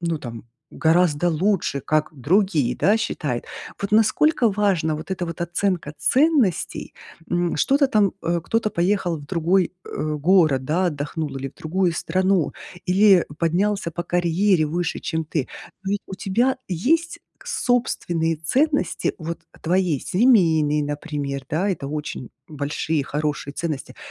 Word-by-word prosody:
ну 170 Hz, -2 st, -1 dB
там 115 Hz, -4 st, -8 dB, 0.3 s
гораздо 165 Hz, 0 st, +2 dB
лучше, 170 Hz, -4 st, 0 dB
как 155 Hz, +3 st, 0 dB
другие, 150 Hz, -, +1 dB
да, 205 Hz, +3 st, +3 dB
считают. 145 Hz, -, -2 dB, 0.4 s
Вот 200 Hz, -, -2 dB
насколько 225 Hz, +4 st, +3 dB
важна 190 Hz, -6 st, +1 dB
вот 155 Hz, +5 st, -7 dB
эта 180 Hz, -1 st, -2 dB
вот 170 Hz, 0 st, -7 dB
оценка 175 Hz, -2 st, -1 dB
ценностей, 250 Hz, -, +1 dB, 0.3 s
м, 175 Hz, -1 st, 0 dB
что-то 275 Hz, -, +3 dB
там, 210 Hz, -6 st, +3 dB
э, 170 Hz, +1 st, 0 dB
кто-то 225 Hz, +5 st, -1 dB
поехал 175 Hz, -2 st, 0 dB
в 145 Hz, -, -12 dB
другой, 175 Hz, +2 st, +1 dB
э, 155 Hz, 0 st, -3 dB
город, 155 Hz, -4 st, +3 dB
да, 175 Hz, +7 st, +1 dB
отдохнул 150 Hz, -2 st, -3 dB
или 135 Hz, 0 st, -4 dB
в -, -, -20 dB
другую 175 Hz, +2 st, 0 dB
страну, 185 Hz, 0 st, +1 dB, 0.3 s
или 190 Hz, 0 st, +5 dB
поднялся 180 Hz, +2 st, 0 dB
по 175 Hz, +1 st, -5 dB
карьере 175 Hz, 0 st, +2 dB
выше, 165 Hz, +3 st, -2 dB
чем 160 Hz, -1 st, -2 dB
ты. 150 Hz, -3 st, -2 dB, 0.3 s
Но 195 Hz, -, -3 dB
ведь 205 Hz, -, 0 dB
у -, -, -6 dB
тебя 235 Hz, +8 st, +1 dB
есть 310 Hz, -, 0 dB, 0.2 s
собственные 175 Hz, -, 0 dB
ценности, 285 Hz, -, 0 dB
вот, 165 Hz, +1 st, -5 dB, 0.2 s
твоей 175 Hz, -4 st, +1 dB
семейной, 165 Hz, -, +3 dB
например, 145 Hz, -2 st, -4 dB
да, 175 Hz, +7 st, 0 dB
это 155 Hz, -7 st, -3 dB
очень 150 Hz, -4 st, -5 dB, 0.2 s
большие 150 Hz, +1 st, -2 dB
хорошие 145 Hz, 0 st, -3 dB
ценности, 155 Hz, -6 st, -4 dB
170 Hz, 140 wpm, -22 LUFS, 155-195 Hz, 0.4 s, или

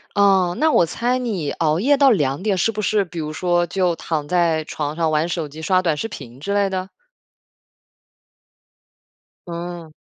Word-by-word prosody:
哦， 190 Hz, -3 st, +3 dB
那 315 Hz, 0 st, +3 dB
我 -, -, +4 dB
猜 245 Hz, +9 st, -1 dB
你 200 Hz, -, -2 dB
熬 155 Hz, 0 st, 0 dB
夜 280 Hz, +8 st, +4 dB
到 275 Hz, -1 st, +6 dB
2 145 Hz, -7 st, +1 dB
点 200 Hz, -1 st, 0 dB
是 225 Hz, +5 st, +2 dB
不 215 Hz, 0 st, -4 dB
是 205 Hz, 0 st, +1 dB
比 170 Hz, -1 st, -8 dB
如 155 Hz, -1 st, -4 dB
说 175 Hz, 0 st, +1 dB
就 180 Hz, -1 st, 0 dB
躺 155 Hz, -3 st, -3 dB
在 170 Hz, -2 st, +2 dB
床 150 Hz, -1 st, -4 dB
上 160 Hz, -1 st, 0 dB
玩 155 Hz, +2 st, +1 dB
手 165 Hz, -3 st, -2 dB
机、 155 Hz, +2 st, -10 dB
刷 185 Hz, +2 st, +2 dB
短 165 Hz, -4 st, +1 dB
视 225 Hz, -, -3 dB
频 130 Hz, -, -10 dB
之 200 Hz, +7 st, -3 dB
类 200 Hz, -1 st, +2 dB
的？ 185 Hz, 0 st, -3 dB, 2.6 s
嗯。 170 Hz, -2 st, -6 dB
175 Hz, 185 characters per minute, -21 LUFS, 160-200 Hz, 2.6 s, 到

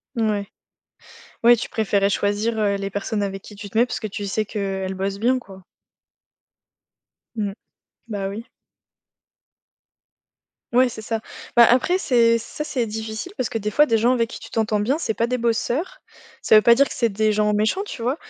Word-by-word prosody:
Mouais. 215 Hz, -3 st, 0 dB, 1.0 s
Ouais, 240 Hz, +1 st, +8 dB
tu -, -, -5 dB
préférais 200 Hz, -2 st, +1 dB
choisir, 205 Hz, +3 st, 0 dB
heu, 205 Hz, -2 st, +2 dB
les 195 Hz, 0 st, -4 dB
personnes 205 Hz, +1 st, -2 dB
avec 195 Hz, -1 st, -4 dB
qui 210 Hz, -, -12 dB
tu 205 Hz, 0 st, -9 dB
te 220 Hz, -, -1 dB
mets, 240 Hz, -, +5 dB
parce -, -, -4 dB
que 215 Hz, -, -4 dB
tu 205 Hz, 0 st, -5 dB
sais 215 Hz, +2 st, -1 dB
qu'elles 195 Hz, -2 st, -3 dB
bossent 195 Hz, +1 st, -3 dB
bien, 250 Hz, +3 st, +2 dB
quoi. 190 Hz, -6 st, -13 dB, 1.7 s
Mmh. 205 Hz, -2 st, -2 dB, 0.6 s
Bah, 200 Hz, -3 st, -3 dB
oui. 215 Hz, +4 st, -7 dB, 2.3 s
Ouais, 250 Hz, +1 st, +5 dB
c'est 220 Hz, -2 st, -8 dB
ça. 225 Hz, +1 st, -2 dB, 0.3 s
Bah, 235 Hz, -1 st, +8 dB
après 260 Hz, +9 st, +3 dB
c'est 230 Hz, -7 st, +3 dB
ça, 230 Hz, +6 st, -6 dB
c'est 255 Hz, -5 st, -1 dB
difficile 220 Hz, -, -5 dB
parce 250 Hz, -, -2 dB
que, 225 Hz, -, -2 dB
des 210 Hz, 0 st, -3 dB
fois, 295 Hz, +8 st, +5 dB
des 230 Hz, -6 st, +2 dB
gens 235 Hz, +3 st, +3 dB
avec 230 Hz, -2 st, 0 dB
qui -, -, -8 dB
tu -, -, -10 dB
t'entends 215 Hz, -2 st, 0 dB
bien, 250 Hz, +8 st, +1 dB
c'est 275 Hz, -, -1 dB
pas 230 Hz, +2 st, 0 dB
des 250 Hz, +1 st, -1 dB
bosseurs. 245 Hz, -, -1 dB, 0.4 s
Ça -, -, +5 dB
veut 215 Hz, -, +7 dB
pas 235 Hz, -, +7 dB
dire 280 Hz, +4 st, +4 dB
que -, -, -7 dB
c'est 235 Hz, -2 st, +1 dB
des 215 Hz, +2 st, +1 dB
gens 210 Hz, 0 st, +2 dB
méchants, 215 Hz, -, +1 dB
tu 415 Hz, -, -8 dB
vois? 250 Hz, +5 st, 0 dB
220 Hz, 195 wpm, -22 LUFS, 205-235 Hz, 2.3 s, Ouais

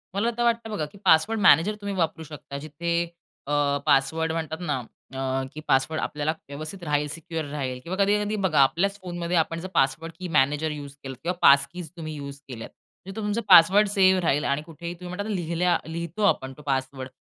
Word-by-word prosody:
मला 230 Hz, +4 st, +1 dB
तर 240 Hz, -, +1 dB
वाटतं 235 Hz, -1 st, +1 dB
बघा 160 Hz, -7 st, -2 dB
की -, -, -15 dB
पासवर्ड 210 Hz, +8 st, +4 dB
मॅनेजर 205 Hz, +1 st, +5 dB
तुम्ही 200 Hz, -1 st, -3 dB
वापरू 165 Hz, -2 st, -1 dB
शकता 150 Hz, -2 st, -9 dB
जिथे 155 Hz, +4 st, -5 dB, 0.6 s
अ, 145 Hz, -1 st, +1 dB
पासवर्ड 160 Hz, +4 st, +2 dB
म्हणतात 160 Hz, -1 st, -3 dB
ना 175 Hz, -, -1 dB, 0.4 s
अ, 130 Hz, 0 st, -1 dB
की 155 Hz, -, -7 dB
पासवर्ड 135 Hz, +4 st, +2 dB
आपल्याला 150 Hz, +1 st, -1 dB, 0.2 s
व्यवस्थित 155 Hz, +6 st, -7 dB
राहील, 150 Hz, -1 st, 0 dB
सिक्युअर 165 Hz, -1 st, -5 dB
राहील 130 Hz, -4 st, -3 dB
किंवा 180 Hz, +3 st, -4 dB
कधी-कधी 210 Hz, +1 st, +1 dB
बघा 155 Hz, -6 st, +2 dB
आपल्याच 195 Hz, +9 st, +2 dB
फोनमध्ये 175 Hz, -1 st, -3 dB
आपण 165 Hz, +1 st, 0 dB
जर 185 Hz, -, -6 dB
पासवर्ड 155 Hz, +4 st, +1 dB
की 185 Hz, -, -4 dB
मॅनेजर 150 Hz, +3 st, +2 dB
युज 145 Hz, -2 st, -7 dB
केलं 135 Hz, -1 st, -6 dB
किंवा 180 Hz, +2 st, 0 dB
पास 140 Hz, 0 st, +7 dB
कीज 175 Hz, -4 st, -7 dB
तुम्ही 155 Hz, -2 st, -6 dB
युज 140 Hz, -1 st, -8 dB
केल्यात. 115 Hz, -3 st, -7 dB, 0.4 s
तिथं 195 Hz, -, -8 dB
तुमचा 210 Hz, +2 st, -1 dB
पासवर्ड 195 Hz, +6 st, +8 dB
सेव्ह 190 Hz, -2 st, +4 dB
राहील 150 Hz, -3 st, +1 dB
आणि 140 Hz, +2 st, 0 dB
कुठेही 170 Hz, +2 st, -8 dB
तुम्ही 180 Hz, +1 st, -8 dB
म्हणता 205 Hz, +2 st, -3 dB
लिहिल्या 175 Hz, 0 st, +1 dB
लिहितो 170 Hz, +5 st, -4 dB
आपण 130 Hz, -9 st, +1 dB
तो 150 Hz, -, -12 dB
पासवर्ड 130 Hz, -1 st, -2 dB
160 Hz, 190 wpm, -25 LUFS, 145-185 Hz, 0.6 s, पासवर्ड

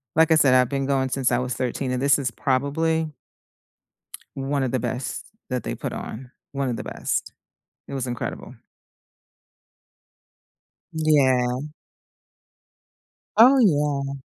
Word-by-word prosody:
like 160 Hz, 0 st, +5 dB
I -, -, +7 dB
said, 135 Hz, -4 st, +5 dB
I've 125 Hz, -1 st, +5 dB
been 135 Hz, -1 st, -2 dB
going 135 Hz, -1 st, +1 dB
since 130 Hz, -1 st, 0 dB
I 120 Hz, -, +3 dB
was 125 Hz, -1 st, -2 dB
13, 125 Hz, +2 st, -2 dB
and 125 Hz, -, -2 dB
this 140 Hz, +1 st, +4 dB
is 125 Hz, -3 st, -2 dB
probably 155 Hz, +5 st, 0 dB, 1.2 s
one 135 Hz, 0 st, -1 dB
of 125 Hz, -, -1 dB
the 130 Hz, -, 0 dB
best 125 Hz, +3 st, -4 dB, 0.2 s
that 125 Hz, -1 st, -2 dB
they -, -, -4 dB
put -, -, -5 dB
on. 125 Hz, +3 st, -7 dB, 0.2 s
One 135 Hz, -2 st, -1 dB
of 115 Hz, -, -2 dB
the -, -, -5 dB
best. -, -, -3 dB, 0.5 s
It -, -, -8 dB
was 130 Hz, -, -2 dB
incredible. 120 Hz, -2 st, -5 dB, 2.4 s
Yeah. 130 Hz, -5 st, +2 dB, 1.8 s
Oh, 255 Hz, +5 st, +8 dB
yeah. 145 Hz, -, +1 dB
135 Hz, 135 wpm, -24 LUFS, 125-145 Hz, 2.4 s, Oh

